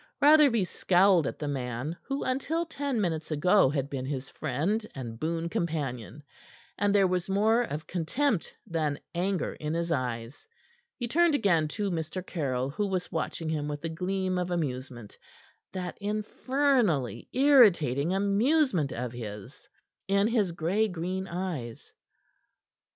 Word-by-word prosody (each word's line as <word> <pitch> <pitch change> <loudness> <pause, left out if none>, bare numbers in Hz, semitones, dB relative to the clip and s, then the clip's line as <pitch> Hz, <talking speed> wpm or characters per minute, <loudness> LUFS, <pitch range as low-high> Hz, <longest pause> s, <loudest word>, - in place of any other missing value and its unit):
Rotherby 290 -7 +6
scowled 180 -2 +3
at - - -4
the 150 - -4
man 130 +2 -3
who 275 0 -3
until 285 +6 -1
ten 285 -6 -2
minutes 160 -5 -1
ago 165 +2 +4
had 140 -1 -1
been 135 -2 -4
his 135 -2 -4
friend 160 - -1
and 115 -4 -6
boon 165 +2 -1
companion, 150 -6 -3 0.5
and 205 0 +1
there 200 -1 +5
was 185 0 -1
more 215 +4 +3
of 155 -9 -4
contempt 190 - -1
than 155 -6 -1
anger 185 +2 -1
in 155 +1 -4
his 170 0 -1
eyes. 125 - -3 0.5
He 240 - -3
turned 335 +4 +3
again 175 - +2
to 205 -2 -1
Mr. 170 +2 -4
Caryll, 135 -7 -2
who 205 +7 -1
was 185 -2 -2
watching 160 0 -3
him 150 -2 -1
with 145 0 -5
a - - -1
gleam 185 +2 -1
of 180 0 -2
amusement 130 - -4 0.5
that 180 -2 -5
infernally 215 - 0
irritating 190 - +5
amusement 200 - +2
of 125 0 -4
his 105 -4 -9 0.4
in 200 +1 +3
his 215 -5 +1
gray 175 +7 +1
green 185 +1 -3
eyes. 170 -11 -5
175 Hz, 140 wpm, -28 LUFS, 145-205 Hz, 0.5 s, Rotherby